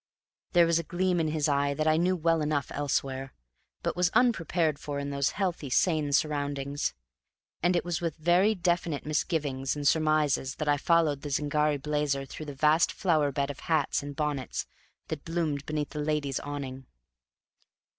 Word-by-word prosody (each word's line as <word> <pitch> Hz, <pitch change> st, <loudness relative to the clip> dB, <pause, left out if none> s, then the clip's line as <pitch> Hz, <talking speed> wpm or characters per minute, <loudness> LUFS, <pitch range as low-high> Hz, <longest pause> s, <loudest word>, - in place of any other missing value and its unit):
There 175 Hz, -2 st, +6 dB
was 165 Hz, 0 st, +2 dB
a -, -, -3 dB
gleam 180 Hz, +2 st, 0 dB
in 160 Hz, -, +1 dB
his 155 Hz, -1 st, 0 dB
eye 140 Hz, -1 st, +1 dB
that 155 Hz, -, -1 dB
I 155 Hz, -, +5 dB
knew 180 Hz, +3 st, +2 dB
well 165 Hz, -1 st, +1 dB
enough 150 Hz, -2 st, -1 dB
elsewhere, 135 Hz, -2 st, -2 dB, 0.5 s
but -, -, -1 dB
was 180 Hz, 0 st, +2 dB
unprepared 170 Hz, -, +2 dB
for 145 Hz, -1 st, -4 dB
in 140 Hz, 0 st, -3 dB
those 140 Hz, 0 st, +1 dB
healthy, 175 Hz, -8 st, -1 dB
sane 155 Hz, +1 st, +2 dB
surroundings; 145 Hz, -, -1 dB, 0.7 s
and 180 Hz, +1 st, +2 dB
it 175 Hz, -, 0 dB
was 175 Hz, -2 st, -2 dB
with 165 Hz, -3 st, -2 dB
very 175 Hz, +7 st, +3 dB
definite 175 Hz, -4 st, -1 dB
misgivings 150 Hz, -3 st, -1 dB
and 145 Hz, -1 st, -1 dB
surmises 155 Hz, -4 st, +2 dB
that 155 Hz, -, -4 dB
I 145 Hz, 0 st, +3 dB
followed 155 Hz, -2 st, +2 dB
the 145 Hz, -, -5 dB
Zingari 150 Hz, +1 st, +1 dB
blazer 145 Hz, -1 st, -1 dB
through 155 Hz, +3 st, -8 dB
the 145 Hz, -, -6 dB
vast 155 Hz, +4 st, +3 dB
flower 155 Hz, -6 st, +1 dB
bed 140 Hz, 0 st, -1 dB
of -, -, -11 dB
hats 160 Hz, -4 st, 0 dB
and 145 Hz, 0 st, -7 dB
bonnets 145 Hz, -4 st, -2 dB, 0.4 s
that 155 Hz, -3 st, -4 dB
bloomed 160 Hz, -4 st, -2 dB
beneath 150 Hz, -1 st, -2 dB
the 150 Hz, -, -5 dB
ladies' 150 Hz, -3 st, -1 dB
awning. 135 Hz, -2 st, -6 dB
150 Hz, 175 wpm, -28 LUFS, 140-165 Hz, 0.7 s, There